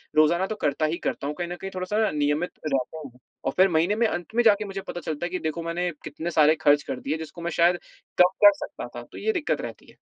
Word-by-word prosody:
रोज़ाना 170 +5 +4
तो 215 - -3
करता 145 +2 +1
ही 160 +2 -1
करता 140 - -2
हूँ, 150 - -3
कहीं 175 +1 -3
न 175 - -4
कहीं 195 - -5
थोड़ा-सा 185 +3 -2
ना - - +1
नियमित 150 +3 0 0.2
रहता 135 +1 -1
हूँ 125 -2 -13 0.3
और - - +1
फिर 190 +1 +6
महीने 170 +4 +2
में 230 +1 +3
अंत 195 +3 -5
में 240 - +4
जाके 210 -2 +4
मुझे 195 -1 -5
पता 175 - -4
चलता 155 +1 -3
है - - -3
कि 185 +1 -3
देखो, 160 +1 -3
मैंने 170 +2 -1
कितने 160 +4 -5
सारे 155 -1 +5
खर्च 145 -1 +4
कर 135 -3 -5
दिए, 150 +4 -2
जिसको 160 +2 -8
मैं 170 +1 -2
शायद 175 +2 +3 0.4
कम 180 - +7 0.2
कर 305 - +10
सकता - - -7
था। - - -6
तो - - -10
ये 440 - 0
दिक्कत 345 -6 -1
रहती - - -8
है। - - -23
170 Hz, 270 wpm, -25 LUFS, 150-190 Hz, 0.4 s, कर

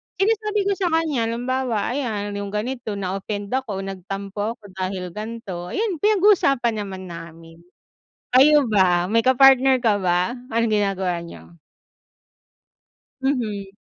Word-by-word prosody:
Sinasabi 425 +2 +1
ko 400 - 0
sa 375 - +1
kanya, 300 -8 0
halimbawa, 245 -1 -1
ayan, 220 -6 -3
yung 200 0 -5
ganito 230 0 -3
na-offend 200 +1 -4
ako, 230 -7 -2
nagtampo 195 +3 -5
ako 225 - -42 0.2
dahil 185 -1 -3
ganito, 210 -3 -6
ayun, 410 -6 -1
pinag-usapan 360 - +3
naman 190 -1 -7
namin. 165 0 -11 0.7
Kayo 290 +2 +6
ba, 185 -5 +3
may 225 +5 +2
ka-partner 260 +1 +5
ka 220 -5 +1
ba? 180 +4 +1 0.2
Anong 230 -1 +1
ginagawa 190 -4 0
niyo? 170 0 -12 1.6
Mhm. 225 -8 -1
220 Hz, 120 wpm, -22 LUFS, 195-265 Hz, 1.6 s, Kayo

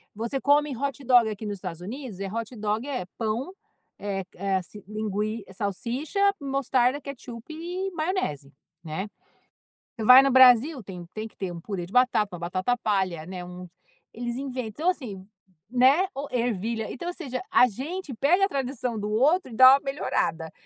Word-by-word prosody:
você 235 +5 -3
come 290 -1 +3
hot 275 +2 -3
dog 240 -3 +5
aqui 215 +1 -6
nos 205 -1 -4
Estados 180 -3 -6
Unidos, 225 0 -7
é 195 - -3
hot 230 +4 -5
dog, 215 +4 -2
é 255 -10 -3
pão, 230 - -2 0.5
eh 195 -2 -3
eh, 195 +1 -1
ass 185 -2 -3 0.2
lingui 215 0 -3
salsicha, 235 - -3 0.2
mostarda, 270 -1 +1
ketchup 265 -1 -9
e 360 +4 -4
maionese, 310 - -2 0.3
né. 165 +6 -4 0.9
Você 225 - -5
vai 255 +4 +9
no 275 - +2
Brasil 260 +2 +6
tem 180 -3 -8
tem 220 +1 -4
que - - -22
ter 190 -3 -3
um 170 -1 -8
purê 185 -3 -4
de 190 - -14
batata, 215 -7 +3
batata 185 +7 0
palha, 190 -7 -1
né, 180 -1 -6
um 180 0 -9 0.4
eles 240 +1 -4
inven 260 -3 -4
então 310 - -1
assim 215 - -4 0.5
né, 265 +9 +4
ou 280 +1 -4
ervilha. 230 -2 -1
Então 345 +7 -6
ou - - -4
seja, 260 -8 -5
a 250 - +6
gente 290 - -5
pega 345 - +3
a - - 0
tradição 255 - -3
do 210 +1 -3
outro 275 - +2
e - - -8
dá 260 +2 +9
uma - - 0
melhorada. 165 - -1
235 Hz, 175 wpm, -26 LUFS, 200-275 Hz, 0.9 s, vai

